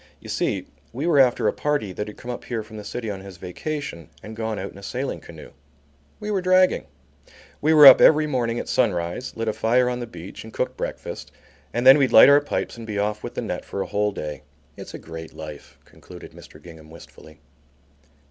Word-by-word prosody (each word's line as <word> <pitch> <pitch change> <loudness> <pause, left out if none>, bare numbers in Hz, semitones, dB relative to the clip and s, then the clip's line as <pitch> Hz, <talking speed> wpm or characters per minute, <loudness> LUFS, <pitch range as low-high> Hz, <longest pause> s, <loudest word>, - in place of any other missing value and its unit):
You - - -12
see - - -1 0.3
we 135 +7 -4
were 170 -5 +3
after 125 -3 +3
a - - +1
party 145 -10 -2
that 105 +3 -5
had 105 - -10
come 125 - -7
up 120 - -7
here 115 -3 -3
from 110 0 -12
the 105 - -8
city 110 +1 -5
on 95 - -6
his 95 -2 -11
vacation 90 - -6
and 110 +1 -9
gone 110 -1 -3
out 95 - -5
in 100 - -13
a - - -13
sailing 130 +6 -4
canoe. - - -13 0.7
We 210 - -4
were 195 -2 0
dragging. 185 - +3 0.7
We 155 +2 +3
were 150 -1 +9
up 135 - +10
every 155 0 +6
morning 120 -5 -1
at - - -4
sunrise, 90 +6 -1
lit 115 0 -3
a 110 - 0
fire 115 +3 +2
on 125 - -4
the 120 - -5
beach 90 -3 -10
and 110 - -11
cooked - - -3
breakfast, - - -6 0.4
and 120 +1 -2
then 135 +3 +9
we'd 135 -2 +2
light 110 - +9
our 145 +1 +6
pipes 145 - -4
and 115 -1 -9
be 105 -2 -4
off 105 +1 -2
with - - -7
the - - -3
net - - -4
for 100 - -5
a - - -8
whole 105 0 -1
day. 75 -6 -6 0.3
It's - - -10
a - - -5
great 80 0 -10
life," 75 -2 -10
concluded - - -13
Mr. - - -15
Gingham 80 -2 -14
wistfully. 80 -1 -15
110 Hz, 225 wpm, -23 LUFS, 95-135 Hz, 0.7 s, up